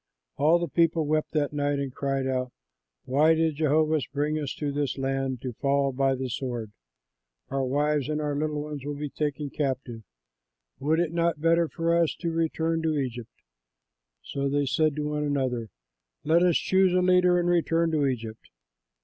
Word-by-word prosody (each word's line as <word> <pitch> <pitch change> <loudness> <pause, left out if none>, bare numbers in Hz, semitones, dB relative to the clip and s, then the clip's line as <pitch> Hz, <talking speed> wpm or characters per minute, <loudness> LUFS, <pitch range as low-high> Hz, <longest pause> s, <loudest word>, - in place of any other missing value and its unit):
All 155 +4 +4
the 170 0 -2
people 165 0 +2
wept 155 +1 0
that 150 -2 0
night 145 -1 0
and 140 -2 -3
cried 135 -1 -1
out, 130 -1 -1 0.5
"Why 150 +5 +4
did 160 -2 0
Jehovah 155 +1 +2
bring 150 +2 -1
us 145 -3 -4
to 145 -2 -2
this 145 -1 -2
land 135 -2 -2
to 125 -2 -4
fall 140 +3 +1
by 135 +1 +1
the 130 0 -3
sword? 120 -3 -4 0.8
Our 135 0 0
wives 145 +2 0
and 150 0 -1
our 150 -1 -1
little 150 0 -2
ones 150 -3 -6
will 145 +1 -4
be 145 -1 -5
taken 145 -1 -3
captive. 130 -5 -3 0.8
Would 155 +4 +1
it 170 -2 0
not 170 -1 +1
be 150 - -16
better 165 0 +4
for 165 +1 0
us 170 -2 +2
to 170 -2 -3
return 165 0 0
to 160 -2 0
Egypt?" 120 -4 -4 0.9
So 140 0 -2
they 145 +1 +1
said 145 +3 +1
to 150 -1 -2
one 150 0 -2
another, 130 -6 -1 0.5
"Let 165 +3 +3
us 175 -2 +4
choose 190 -1 +3
a 185 - +4
leader 180 -1 +4
and 175 - 0
return 165 -1 +2
to 150 -3 +2
Egypt." 115 -4 -5
150 Hz, 185 wpm, -26 LUFS, 135-160 Hz, 0.9 s, All